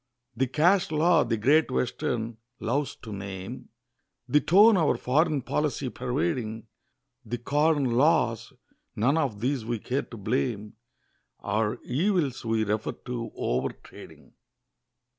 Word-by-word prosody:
The 130 +2 +1
Cash 175 +8 +3
Law 160 +1 +3
the 115 -1 -1
"Great 145 +9 +3
Western" 120 -2 -2 0.2
loves 140 +5 -1
to 110 -3 -7
name; 95 -1 -7 0.6
The 150 - +4
tone 205 +6 +6
our 165 -5 +2
foreign 145 +1 +1
policy 145 -2 -1
pervading; 125 -4 -2 0.6
The 120 - -4
Corn 145 +4 +1
Laws 125 -2 +2 0.4
none 125 +8 +2
of 120 -9 -2
these 130 0 0
we 115 +1 -2
care 130 +6 -2
to 115 - -11
blame, 110 0 -2 0.7
Our 110 +2 -1
evils 150 - 0
we 115 -1 +1
refer 105 +1 -1
to 120 -2 -6
over 65 +2 -1
trading. - - -14
125 Hz, 125 wpm, -27 LUFS, 115-150 Hz, 0.7 s, tone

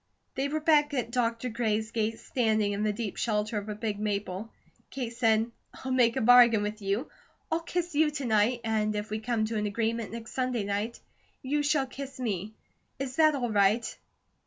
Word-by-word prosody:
They 270 +1 -1
were 310 +2 -1
back 300 -2 +3
at 240 -3 -2
Dr. 235 -1 0
Gray's 220 -1 -1
gate, 225 0 -1
standing 220 -4 +1
in 200 0 -2
the 215 0 +2
deep 210 -1 -4
shelter 210 -1 0
of 205 +1 -8
a 210 - -3
big 210 -1 -3
maple. 205 0 -3 0.4
Kate 240 -3 -5
said: 225 -1 +2 0.2
"I'll 260 - -6
make 245 -3 +3
a - - 0
bargain 235 -2 +7
with 210 +1 -4
you. 200 +8 -2 0.4
I'll 325 - +2
kiss 350 0 -3
you 305 +1 +4
to 290 -2 -4
night, 225 +2 +2
and 215 -1 0
if 210 +1 -4
we 215 - -1
come 225 -1 0
to 220 0 -3
an 210 0 0
agreement 225 +1 -2
next 230 0 -7
Sunday 255 -4 -1
night, 205 +4 -2 0.4
you 290 +3 0
shall 290 -1 +2
kiss 270 0 -8
me. 215 -3 -3 0.4
Is 265 -1 -5
that 310 -2 +5
all 245 -4 -2
right?" 210 +3 +2
230 Hz, 195 wpm, -29 LUFS, 215-255 Hz, 0.4 s, bargain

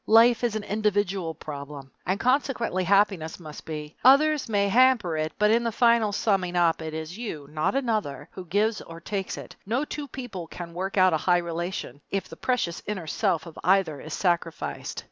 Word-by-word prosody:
Life 230 +2 +6
is 235 -3 +1
an 215 - -2
individual 205 -5 0
problem, 140 -2 -8 0.2
and 190 +2 0
consequently 245 -7 +1
happiness 195 -5 +2
must 155 -3 -10
be. 150 -1 -6
Others 290 +1 +5
may 200 -2 +2
hamper 230 -6 +4
it, 155 0 -1
but 210 +1 +4
in 235 +1 +3
the 230 - 0
final 230 -2 +3
summing 195 -4 0
up 170 -2 +3
it 160 -1 -5
is 160 +6 -6
you, 155 -12 -5
not 155 - 0
another, 215 - -1
who 185 - -8
gives 210 +5 +1
or 165 0 -10
takes 195 +3 -4
it - - -9
no 240 +8 -1
two 295 -1 -5
people 230 -10 -7
can 170 0 -8
work 190 +3 -3
out 185 -2 +5
a - - +3
high 175 +3 +3
relation 170 -5 -4
if 195 -1 -2
the - - -10
precious 245 -10 -1
inner 200 -5 -3
self 180 +1 0
of 165 - -10
either 180 -6 +2
is 155 - -5
sacrificed. 170 -3 -2
190 Hz, 190 wpm, -26 LUFS, 165-225 Hz, 0.2 s, Life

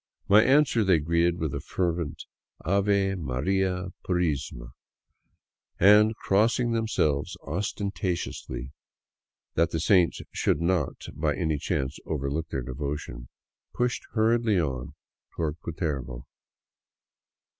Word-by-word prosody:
My 105 +2 +7
answer 135 -3 +4
they 95 -4 +4
greeted 85 +3 +1
with 80 -5 -2
a - - -2
fervent 85 -4 -2 0.2
" - - -24
Ave 100 +1 +2
Maria 90 +4 -1
Purisima! 75 -9 -2 0.6
" - - -48
and, 105 +3 +6
crossing 115 +5 +2
themselves 90 -9 0
ostentatiously, 90 - -3 0.8
that 85 0 +2
the 80 - -2
saints 90 +1 +3
should - - +1
not 85 -2 -1
by 75 -1 0
any 80 -4 -1
chance 65 0 -2
overlook 75 +1 -2
their 65 - -3
devotion, 65 -2 -5 0.5
pushed 125 0 0
hurriedly 110 -2 +3
on 70 -2 -3 0.4
toward 80 -1 -2
Cu - - -5
tervo. 70 -7 -4
85 Hz, 115 wpm, -27 LUFS, 75-100 Hz, 0.8 s, My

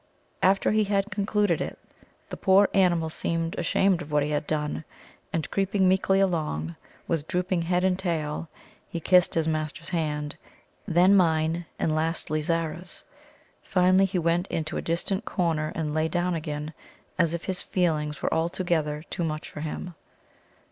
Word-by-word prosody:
After 195 +1 +3
he 215 0 +3
had 200 +1 0
concluded 205 -2 +1
it, - - -4 0.5
the - - -3
poor 195 +1 +4
animal 175 -4 +3
seemed 165 +1 -1
ashamed 185 +1 +2
of 150 - -8
what 150 -1 +3
he 150 - -2
had 150 0 -1
done, 150 0 -2 0.5
and 160 -2 -2
creeping 195 -1 +2
meekly 190 +1 +3
along, 155 - 0 0.3
with 160 -2 -1
drooping 180 0 0
head 180 +2 +1
and 185 0 +2
tail, 165 -3 -2 0.4
he 170 - -3
kissed 180 +2 +4
his 160 -1 +1
master's 155 +1 -2
hand, 150 -4 -2 0.5
then 180 +2 +5
mine, 165 -2 +2
and 155 - 0
lastly 155 -1 -1
Zara's. 165 +2 -2 0.6
Finally, 185 +1 +4
he 190 0 -2
went 170 +2 +1
into 160 -2 -3
a - - -1
distant 190 +5 -1
corner 160 -4 -1
and 155 -2 -2
lay 155 +1 +1
down 175 +2 0
again, 155 -1 -4 0.5
as 170 -1 +3
if 170 - -6
his 185 -2 -1
feelings 155 -5 -1
were - - +1
altogether 160 -2 0
too 175 - -2
much 155 -1 -3
for - - -8
him. 160 +3 -5
170 Hz, 160 wpm, -26 LUFS, 155-185 Hz, 0.6 s, then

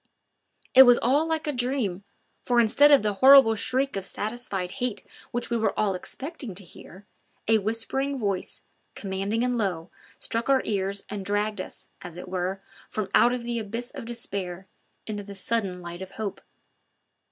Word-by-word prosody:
It 260 - +10
was 245 -2 +8
all 285 +6 +2
like 320 0 -1
a 300 - 0
dream, 245 -7 -1 0.4
for 245 -1 +2
instead 235 +6 +6
of 285 -6 +6
the 210 -1 +1
horrible 265 -4 +8
shriek 255 +5 0
of 195 - -3
satisfied 205 -3 -3
hate 245 -4 -2 0.2
which 240 0 -4
we 235 - +2
were 220 -1 0
all 205 -2 +2
expecting 265 - -7
to 195 - -3
hear, 185 +2 -14 0.4
a 220 0 +4
whispering 230 +6 -1
voice, 200 -6 -3 0.3
commanding 195 +3 -2
and 250 0 0
low, 185 -5 -2 0.3
struck 230 +3 -2
our 270 -1 +4
ears 200 -1 -1
and 205 -1 -5
dragged 205 0 -1
us, - - -9
as 175 -1 -9
it 180 - -8
were, 185 +1 -3 0.3
from 210 -3 -3
out 245 +1 +4
the 235 0 -3
abyss 230 +3 -5
of - - -8
despair 195 -6 -3 0.4
into 210 -2 -4
the 200 0 -10
sudden 195 -3 -2
light 175 +1 -7
of 190 0 -8
hope. 210 -3 -5
215 Hz, 170 wpm, -26 LUFS, 195-245 Hz, 0.4 s, It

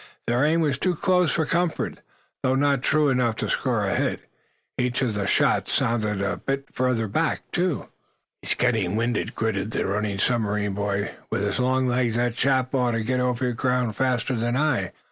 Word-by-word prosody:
Their 120 +3 +1
aim 160 +3 +3
was 145 -4 0
too 185 -2 +1
close 180 0 +2
for 160 - +1
comfort, 170 +1 -1 0.4
though 130 0 +2
not 140 -1 +2
true 150 +2 +3
enough 125 -4 +1
to - - -3
score - - 0
a - - 0
hit. - - -1 0.6
Each 125 +1 0
of 120 -4 0
the 100 -1 -2
shots - - +2
sounded 105 -4 0
a 95 -2 -1
bit 135 +8 -3
further 125 -3 0
back, 160 +11 0
too. 175 -4 -1 0.5
"He's - - 0
getting 90 +3 +1
winded," 115 0 -1
gritted 110 -2 -1
the - - -1
running 100 +1 -1
submarine 105 -2 0
boy. 100 0 -1 0.2
"With 100 - -1
his 100 +5 -1
long 130 +1 +2
legs 120 -2 +1
that 120 0 +1
chap 130 +1 +1
ought 125 -3 +2
to 115 -1 -1
get 125 +3 0
over 125 0 0
ground 125 -2 0
faster 130 +1 0
than 120 +2 0
I. 130 - +1
125 Hz, 185 wpm, -24 LUFS, 110-135 Hz, 0.6 s, aim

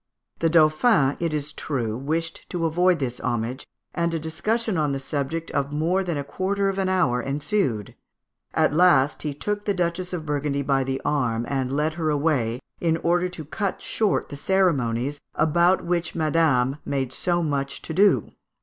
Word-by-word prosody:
The 165 - +2
Dauphin, 155 - +4
it 170 -2 -1
is 150 0 -3
true, 120 -8 -2
wished 160 +6 -3
to 175 -2 -2
avoid 175 +2 +3
this 125 -4 -3
homage, 120 +3 -3 0.3
and 170 +1 0
a - - -1
disussion 215 +8 -1
on 150 -4 +1
the 135 - -2
subject 145 +4 -3
of 140 0 -1
"more 165 +6 +1
than 170 -4 -2
a 140 - -2
quarter 195 +6 -1
of 195 0 -2
an 190 -1 +1
hour 140 -10 +2
ensued;" 140 - -1 0.6
at - - +3
last 155 -4 +4
he 150 - -2
took 205 +7 -3
the 205 - +1
Duchess 180 0 -1
of 170 -4 -4
Burgundy 145 -1 -1
by 135 -1 +2
the 135 0 -2
arm 120 -6 0
and 130 -2 -1
led 150 +3 0
her 160 -1 -1
away, 140 -6 +1 0.2
in 165 -1 +1
order 175 +2 +1
to 170 -4 -8
cut 195 +5 -3
short 215 -3 0
the - - -6
ceremonies 145 -7 +1
"about 170 +4 +3
which 170 -1 -1
Madame 150 -5 +2
made 135 -3 -2
so 175 -1 0
much 140 -2 -2
to 160 - -5
do." 200 +4 +3
155 Hz, 175 wpm, -24 LUFS, 140-175 Hz, 0.6 s, Dauphin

